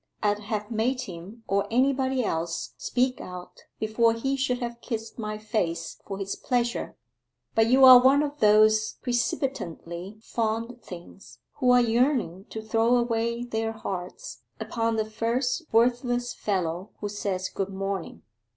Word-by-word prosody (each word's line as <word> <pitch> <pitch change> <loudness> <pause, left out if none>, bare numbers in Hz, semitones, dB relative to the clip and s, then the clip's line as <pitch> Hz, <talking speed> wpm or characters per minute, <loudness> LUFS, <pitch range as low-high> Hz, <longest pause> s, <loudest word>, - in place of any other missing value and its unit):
I'd 205 0 +2
have 210 +1 -4
made 245 +4 0
him 190 +5 -9
or 200 +1 +1
anybody 260 +1 +2
else 165 -4 -2
speak 255 +1 0
out 180 -1 -9 0.2
before 225 +1 +2
he 270 +4 -1
should 260 -2 0
have 235 -1 -5
kissed 225 -1 -5
my 215 -1 -3
face 180 -7 -3
for 195 - -4
his 195 0 -3
pleasure. 240 -2 -1 0.6
But 225 0 +4
you 260 +3 +6
are 255 -1 +11
one 275 +3 +5
of 295 0 -4
those 215 +1 +5
precipitantly 215 - -3
fond 230 +2 -2
things 180 0 -12 0.2
who 250 - +3
are 250 0 +7
yearning 230 - +1
to 220 - -7
throw 225 +2 +2
away 235 0 0
their 225 -2 -2
hearts 195 - -6 0.2
upon 230 -1 -1
the 220 -1 0
first 245 +8 -2
worthless 245 +1 +2
fellow 185 -2 -2
who 205 - -3
says 200 -2 -3
good 195 0 -3
morning. 195 -1 -4
225 Hz, 145 wpm, -26 LUFS, 200-245 Hz, 0.6 s, are